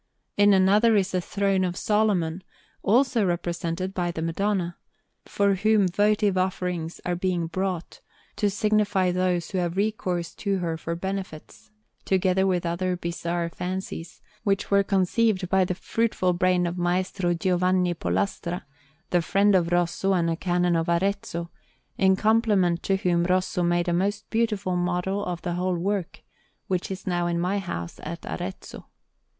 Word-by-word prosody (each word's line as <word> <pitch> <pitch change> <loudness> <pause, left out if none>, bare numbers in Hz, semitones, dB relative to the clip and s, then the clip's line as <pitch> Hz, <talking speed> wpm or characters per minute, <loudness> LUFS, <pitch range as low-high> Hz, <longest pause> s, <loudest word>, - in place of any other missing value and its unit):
In 205 0 +5
another 205 +4 +5
is 195 -2 +2
the 185 - 0
Throne 195 +1 0
of 180 0 -2
Solomon, 195 -5 +1 0.4
also 240 +1 +3
represented 175 0 -2
by 175 -2 -1
the 160 -2 -4
Madonna, 175 +1 -1 0.5
to 200 -1 +1
whom 210 0 +3
votive 205 +1 +2
offerings 180 -3 -2
are 180 - 0
being 175 -1 -1
brought, 180 0 -3 0.4
to 205 - +2
signify 205 -2 +1
those 180 -1 0
who 190 - -1
have 175 0 -2
recourse 190 -5 -1
to 200 -2 -1
her 170 -3 -2
for 165 +1 -4
benefits: 190 -2 -6 0.3
together 190 0 +2
with 180 -2 0
other 180 +2 -1
bizarre 170 0 -2
fancies, 180 -1 -6 0.2
which 200 -2 0
were 200 0 +5
conceived 195 +1 +1
by 190 0 +4
the 180 0 -1
fruitful 205 -3 0
brain 180 0 +2
of 175 +1 -3
M. 180 +1 +2 0.3
Giovanni 180 0 +2
Pollastra, 175 0 -2 0.5
the 175 - +3
friend 200 +4 +3
of 175 -2 +2
Rosso 175 +2 +1
and 170 -2 +1
a - - 0
Canon 175 0 +1
of 165 0 0
Arezzo, 170 -1 -1 0.5
in 190 -1 +5
compliment 205 -5 +2
to 195 - +1
whom 175 -2 +1
Rosso 185 0 +1
made 175 0 +1
a 175 - +1
most 200 +3 -1
beautiful 210 -5 0
model 180 +3 -1
of 175 -3 -4
the 175 - -2
whole 180 0 -1
work, 190 0 -3 0.4
which 185 -1 -2
is 190 -1 -6
now 175 -1 0
in 170 0 0
my 185 +4 0
house 85 - -6
at 170 +2 -7
Arezzo. 185 +2 -6
185 Hz, 155 wpm, -25 LUFS, 175-195 Hz, 0.5 s, In